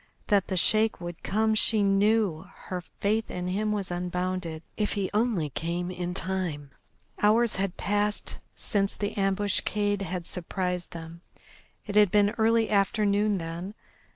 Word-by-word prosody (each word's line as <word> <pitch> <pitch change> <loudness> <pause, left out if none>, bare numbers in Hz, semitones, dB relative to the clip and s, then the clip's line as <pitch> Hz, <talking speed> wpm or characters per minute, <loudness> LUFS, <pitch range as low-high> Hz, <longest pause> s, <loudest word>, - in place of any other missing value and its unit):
That 200 -2 +3
the 185 - -2
Sheik 215 +5 +3
would 175 -1 -7
come 220 +1 +1
she 215 -1 +3
knew, 200 -3 +2 0.2
her 180 -1 -2
faith 215 +5 -1
in 180 0 -4
him 210 +3 0
was 200 -4 -2
unbounded. 180 -2 -2
If 210 -1 0
he 195 -2 -2
only 210 - +1
came 175 +5 -2
in 180 0 -4
time! 180 -8 -3 0.5
Hours 220 +1 +4
had 195 -1 -2
passed 205 +1 -1 0.2
since 200 -1 -1
the 205 -1 -2
ambuscade 205 +1 0
had 180 -2 -4
surprised 180 0 -3
them. 165 0 -9 0.6
It 205 - -5
had 210 -2 +6
been 205 +1 +4
early 225 0 +4
afternoon 205 0 +2
then. 170 +4 -5
195 Hz, 145 wpm, -27 LUFS, 180-210 Hz, 0.6 s, had